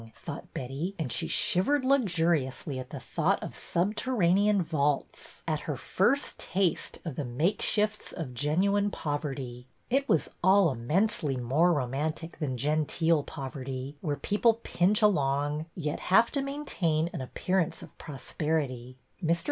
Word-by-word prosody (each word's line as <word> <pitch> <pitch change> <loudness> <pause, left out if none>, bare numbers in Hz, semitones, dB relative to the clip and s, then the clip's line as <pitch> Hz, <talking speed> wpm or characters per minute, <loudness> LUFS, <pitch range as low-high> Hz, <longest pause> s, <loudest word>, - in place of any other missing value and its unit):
thought - - -8
Betty, 140 +10 -4
and 155 -7 -3
she - - -1
shiv 180 +3 +2
ered 290 -2 +2
luxuriously 170 - +1
at 130 0 -7
the 140 - -6
thought 170 +8 0
of - - -6
subterranean 200 0 +2
vaults, 150 -3 -2
at 155 -2 0
her 145 - -1
first 245 - +1
taste 185 -2 0
of 160 -6 -4
the 150 - -1
makeshifts 205 - 0
of 150 -8 -6
genuine 190 - +2
poverty. 135 -7 -4 0.2
It 275 +2 +2
was 160 - +2
all 190 -2 +5
immensely 150 - 0
more 140 +9 +3
romantic 155 +4 -2
than 135 -5 -2
genteel 155 +3 +2
poverty, 135 0 -6
where 150 -4 -1
people 220 +2 +2
pinch 205 +5 +2
along, 145 -4 +2
yet 150 -4 -2
have 225 +5 +4
to 280 - 0
maintain 180 - -1
an - - -4
appearance 180 +6 -1
of - - -13
prosperity. 135 -3 -3 0.3
Air. 165 +1 +3
160 Hz, 140 wpm, -29 LUFS, 140-195 Hz, 0.3 s, all